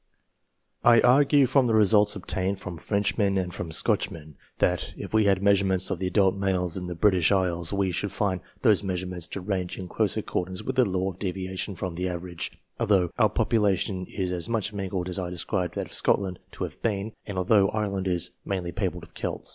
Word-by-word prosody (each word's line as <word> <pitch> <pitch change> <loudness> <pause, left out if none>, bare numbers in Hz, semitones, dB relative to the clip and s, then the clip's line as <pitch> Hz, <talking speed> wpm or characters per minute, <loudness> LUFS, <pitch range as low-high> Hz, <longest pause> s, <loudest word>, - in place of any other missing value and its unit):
I 120 -1 +7
argue 140 +2 +5
from 130 0 +3
the 115 - +2
results 105 -1 +4
obtained 95 0 -2
from 90 -4 -7
Frenchmen 100 0 +1
and 90 -2 -2
m 85 -2 -5
Scotchmen, 80 -2 -1 0.2
that, 90 -1 0
if - - -7
we 110 -1 +4
had 100 -1 +2
measurements 95 -2 +3
of 95 - -2
the 95 -1 -2
.ult 95 -2 +4
males 95 -3 -1
in 90 -1 -4
the 90 - -5
British 90 -1 +3
Isles, 90 -4 +1
we 100 -2 0
should 100 +2 -2
find 95 -4 -1 0.2
those 105 -5 +4
measurements 90 -2 -3
to 95 - -5
range 90 -2 -3
in 95 - -6
close 105 +2 0
accordance 95 -3 -3
with 130 - -3
the 130 - +5
law 95 +1 -1
of 90 - -16
deviation 95 0 -3
from 90 -1 -4
an 90 +2 -2
average, 85 -1 -5 0.3
although 95 -4 +2
our 110 -2 +5
population 100 -5 +1
is 95 -3 -3
as 90 +3 -4
much 110 -2 -1
mingled 95 -2 -3
as 90 +1 -2
I 90 -1 -3
described 90 +1 -2
that - - -2
of - - -13
Scotland 95 -3 +1
to - - -5
have - - -7
been, 110 -1 -1
and 100 -3 -5
although 95 +1 +4
Ireland 100 -3 -2
is 90 -3 0
mainly 90 -3 -3
peopled - - -3
with - - -14
Celts. - - -4
95 Hz, 205 wpm, -26 LUFS, 90-105 Hz, 0.3 s, I